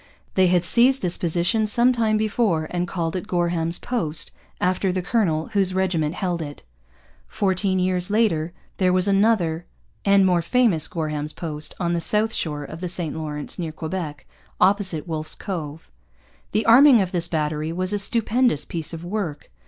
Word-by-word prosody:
They 185 -1 +4
had 175 -1 +2
seized 250 +6 +3
this 180 -1 +1
position 175 +6 +1
some 240 +4 +3
time 220 -3 +1
before 210 -7 0
and 180 0 -1
called 165 -2 -3
it 185 +2 -4
Gorham's 170 -3 0
Post, 165 -11 -2 0.3
after 185 +1 +1
the 185 0 -2
colonel 170 -7 0
whose 190 -2 0
regiment 175 -4 0
held 175 -3 -2
it. 145 -2 -8 0.6
Fourteen 190 - 0
years 180 0 0
later 190 -7 +1 0.3
there 185 -1 +2
was 185 +1 +2
another 195 -5 +2 0.4
and 200 -1 +4
more 180 -2 +3
famous 195 -4 +2
Gorham's 150 -2 -4
Post, 155 -2 -3
on 175 -2 0
the 170 - -1
south 220 +5 +1
shore 150 -3 -3
of 160 +3 -9
the 180 - -3
St 170 -3 -2
Lawrence 150 -1 -5
near 165 -3 -3
Quebec, 155 -2 -5 0.3
opposite 190 -5 +2
Wolfe's 155 -1 -4
Cove. 160 -5 -6 0.6
The 215 - 0
arming 250 +2 +7
of 185 -3 -1
this 175 -2 +1
battery 155 -1 -2
was 185 +3 -2
a 205 - 0
stupendous 230 - +3
piece 165 -1 -5
of 165 0 -7
work. 175 - -4
180 Hz, 170 wpm, -23 LUFS, 160-200 Hz, 0.6 s, arming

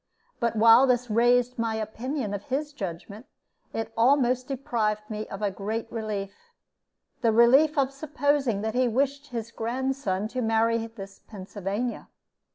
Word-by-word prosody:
But 235 -2 0
while 230 +4 +7
this 245 -2 +1
raised 245 +2 +3
my 225 -1 0
opinion 220 +2 -3
of 205 0 -5
his 290 +3 -3
judgment, 200 - -7 0.4
it 225 0 -4
almost 255 +1 +3
deprived 220 -6 -2
me 215 0 -4
of 195 +2 -7
a 205 - +1
great 220 +4 -4
relief 210 -3 -4 0.9
the 230 -2 +3
relief 265 +7 +5
of 270 -1 +2
supposing 275 -6 0
that 220 0 -2
he 250 0 +2
wished 280 +4 0
his 230 -3 -5
grandson 235 -4 -2
to 255 +2 -3
marry 225 0 +1
this 195 -3 -11
Pennsylvania. 205 +3 -5
230 Hz, 145 wpm, -26 LUFS, 215-255 Hz, 0.9 s, while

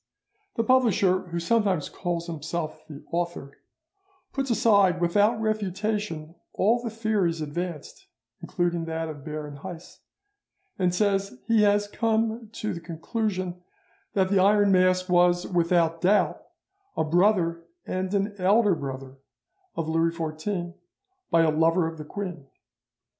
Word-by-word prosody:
The 230 - +1
publisher, 200 -7 +3
who 170 0 -3
sometimes 190 -3 +1
calls 175 -2 -3
himself 160 -1 -5
the 145 -2 -11
author, 170 -5 -3 0.7
puts 270 -1 -2
aside 200 -6 +4
without 205 +6 +2
refutation 210 -6 -2 0.2
all 230 +5 +2
the 235 - -3
theories 215 -7 0
advanced, 155 +1 -5 0.3
including 175 -2 -1
that 165 0 -3
of 145 -3 -8
Baron 150 -1 -6
Heiss, 175 +2 -10 0.8
and 180 -1 +2
says 195 -4 0
he 225 -2 +4
has 205 0 +3
come 225 +1 -1
to 215 -1 -3
the - - -6
conclusion 180 +2 -3 0.5
that 190 -2 +2
the 200 -1 +3
Iron 205 +1 +4
Mask 185 0 +3
was, 175 0 +3
without 170 -2 +1
doubt, 195 +4 +2 0.6
a - - +2
brother 170 0 +2 0.2
and 185 0 -3
an 200 +1 0
elder 200 +2 +4
brother 135 -3 -6 0.6
of 165 - -2
Louis 165 +1 +2
XIV, 175 +3 -3 0.6
by 165 - +4
a 160 - +3
lover 165 +3 +3
of 160 -1 -7
the 150 - -7
queen. 175 -5 -6
180 Hz, 130 wpm, -26 LUFS, 165-205 Hz, 0.8 s, aside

